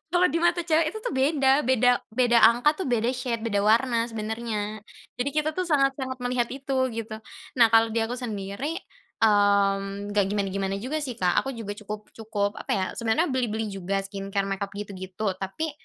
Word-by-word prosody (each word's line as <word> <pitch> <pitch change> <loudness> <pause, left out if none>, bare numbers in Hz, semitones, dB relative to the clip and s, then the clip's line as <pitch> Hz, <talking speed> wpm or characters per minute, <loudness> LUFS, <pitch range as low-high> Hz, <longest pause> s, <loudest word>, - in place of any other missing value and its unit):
kalau 360 +1 +5
di - - +3
mata 345 0 +3
cewek 320 -1 +3
itu 435 - -7
tuh - - -2
beda 270 0 +3
beda 250 -1 +3 0.2
beda 240 0 +3
angka 245 +6 +3
tuh - - -4
beda 235 -1 +1
shade 245 -2 -2
beda 205 -2 +1
warna 230 +1 +3
sebenarnya. 215 -1 -4 0.4
Jadi 260 +3 0
kita 305 0 +2
tuh 370 - +1
sangat-sangat 275 -4 +1
melihat 245 -1 0
itu 270 0 -4 0.2
gitu, 225 0 -5 0.4
nah 235 - +8
kalau 225 0 +6
di 230 - +2
aku 240 - -3
sendiri, 220 +5 -4 0.5
mmm, 200 -1 +2
nggak 205 -1 +2
gimana 200 -1 0
gimana 195 0 -2
juga 305 +4 -1
sih 250 - -4
Kak 180 -1 +2
aku - - -1
juga 210 -3 -5
cukup 210 0 -7
cukup 210 -2 -1
apa - - -7
ya 190 -2 0
sebenarnya 230 +9 +1
beli-beli 225 -4 -1
juga 195 +1 -2
skincare 195 0 -3
makeup 195 0 -2
gitu 205 -1 -6
gitu 190 +2 -3
tapi, 245 +12 -3
225 Hz, 185 wpm, -26 LUFS, 200-260 Hz, 0.5 s, nah